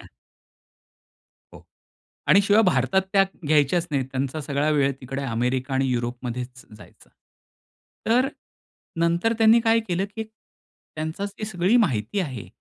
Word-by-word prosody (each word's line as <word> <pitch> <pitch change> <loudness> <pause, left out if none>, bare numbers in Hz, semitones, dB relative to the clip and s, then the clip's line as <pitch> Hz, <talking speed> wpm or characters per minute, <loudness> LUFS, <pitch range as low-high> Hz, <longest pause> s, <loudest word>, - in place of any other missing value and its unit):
हां. - - -14 1.5
हो - - -13 0.7
आणि 200 - +6
शिवाय 205 +2 +4
भारतात 175 - +2
त्या 195 -1 +6 0.2
घ्यायच्याच 155 +3 +2
नाहीत. 135 -3 0
त्यांचा 135 +3 -3
सगळा 145 +1 -1
वेळ 140 -2 +2
तिकडे 135 +2 -5
अमेरिका 125 +2 -1
आणि 135 0 +1
युरोपमध्येच 125 +1 -4
जायचा. - - -18 1.0
तर 250 +4 +3 0.7
नंतर 170 +7 +2
त्यांनी 225 +1 +6
काय 225 0 +3
केलं, 185 +2 0
की 220 - -3
त्यांची 195 -5 -9
जी 210 +2 -7
सगळी 200 +3 +2
माहिती 130 - 0
आहे. 130 - -4
155 Hz, 130 wpm, -24 LUFS, 130-200 Hz, 1.5 s, आणि